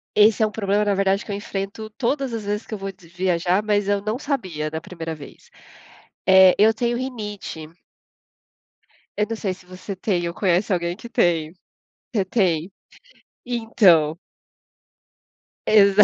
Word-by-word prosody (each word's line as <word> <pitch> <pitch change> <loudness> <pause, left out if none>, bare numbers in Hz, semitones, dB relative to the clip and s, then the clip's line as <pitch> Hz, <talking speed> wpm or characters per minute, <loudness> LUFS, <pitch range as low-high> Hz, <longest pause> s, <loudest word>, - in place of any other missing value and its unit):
Esse 210 +1 +5
é 215 - +4
um - - -7
problema, 205 -1 0
na 205 - +2
verdade, 195 0 +1
que - - -7
eu 200 - -2
enfrento 200 +2 -5
todas 265 +2 -1
as 225 - -3
vezes 205 +2 -3
que - - -8
eu - - -2
vou 195 0 -5
de 180 -3 -20
viajar, 180 +2 +1
mas 205 -1 +1
eu 205 0 +1
não 215 +3 -2
sabia 185 - -3
da 160 +1 -5
primeira 165 -1 -6
vez, 145 -2 -13 0.8
eh, 190 -1 +8
eu 220 +2 +6
tenho 240 +1 0
rinite 210 -10 -6 1.5
eu 210 - +2
não 225 - -2
sei 195 -3 -2
se 185 0 -17
você 185 +2 -8
tem, 180 -3 -1
ou 170 - -4
conhece 190 +1 +1
alguém 170 0 -1
que 235 +3 -11
tem? 165 -6 +1 0.6
Você 200 -4 +2
tem? 185 -3 0 0.7
Então 205 -10 +3 1.5
Exa 205 -1 +6
200 Hz, 160 wpm, -22 LUFS, 180-215 Hz, 1.5 s, eh